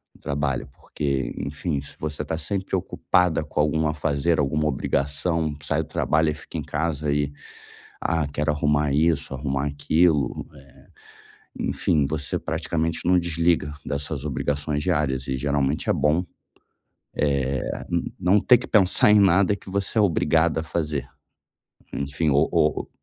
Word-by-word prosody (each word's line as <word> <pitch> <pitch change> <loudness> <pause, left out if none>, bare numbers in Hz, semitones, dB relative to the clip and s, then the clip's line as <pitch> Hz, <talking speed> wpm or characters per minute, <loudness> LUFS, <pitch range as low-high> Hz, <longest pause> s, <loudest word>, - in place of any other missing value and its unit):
do - - -21
trabalho. 70 -2 -2
Porque, 70 -3 -3
enfim, 75 +2 -3
se 70 0 -9
você 75 0 -3
tá 80 +2 -3
sempre 95 +3 -2
preocupada 90 -3 +1
com 75 - -5
algum 75 +1 +2
afazer, 75 +2 0
alguma 75 +2 +1
obrigação, 75 +3 0
sai - - 0
do - - -13
trabalho 80 0 +1
e - - -3
fica 75 - -9
em - - -3
casa 75 -1 -1
e: 70 -1 0 0.7
"Ah, 80 -3 0
quero 75 +2 -1
arrumar 75 0 +1
isso, 75 -2 +1
arrumar 70 0 -2
aquilo", 75 -1 +1
eh, 65 - -14 1.0
enfim, 75 -3 +1
você 75 0 -2
praticamente 80 0 -2
não 90 +1 +4
desliga 85 -3 +1
das 70 0 -2
suas 70 -1 -5
obrigações 75 +1 -2
diárias 70 -7 0
e 65 -1 -1
geralmente 70 +1 0
é - - +4
bom, 80 +4 +2 1.5
eh, - - -6
n - - -2
não 95 +4 +4
ter 125 +4 +6
que - - -7
pensar 105 0 +4
em 105 - +6
nada 100 +1 +4
que 100 - -13
você 100 +3 -2
é - - +6
obrigada 80 -3 +2
a - - -6
fazer. 75 -5 -2 0.9
Enfim, 70 +3 -1
o 75 +2 +3
ou - - +1
75 Hz, 155 wpm, -24 LUFS, 70-85 Hz, 1.5 s, ter